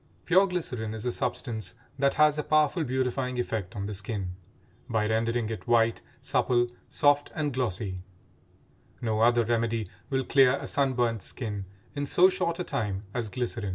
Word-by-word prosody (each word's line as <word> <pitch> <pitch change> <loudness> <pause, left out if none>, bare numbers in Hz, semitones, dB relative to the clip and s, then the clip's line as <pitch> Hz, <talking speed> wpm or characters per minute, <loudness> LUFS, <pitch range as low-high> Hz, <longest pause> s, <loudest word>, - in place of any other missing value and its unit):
Pure 190 +2 +5
glycerin 125 - -3
is 110 +1 -6
a 125 - +1
substance 110 -6 -3 0.2
that 140 0 +2
has 150 -1 +5
a 150 - 0
powerful 155 +3 +2
beautifying 130 -1 -1
effect 110 -6 -3
on 100 -1 -3
the 105 - -4
skin, 100 -2 -3 0.6
by 110 -2 +1
rendering 115 +1 0
it 110 - -6
white, 115 -1 +3 0.2
supple, 120 -1 +2 0.2
soft, 145 0 +3
and 150 -3 -1
glossy; 105 -6 -2 1.0
no 110 -2 -1
other 120 0 +4
remedy 115 -2 0 0.2
will 135 -1 0
clear 130 0 +5
a - - -6
sun 140 -2 +1
burnt 120 -3 0
skin 105 -1 -4 0.3
in 145 -1 -2
so 180 +6 +6
short 180 -3 -1
a 180 - -2
time 100 - -2
as 120 -4 -2
glycerin. 120 -3 -2
120 Hz, 165 wpm, -28 LUFS, 110-140 Hz, 1.0 s, so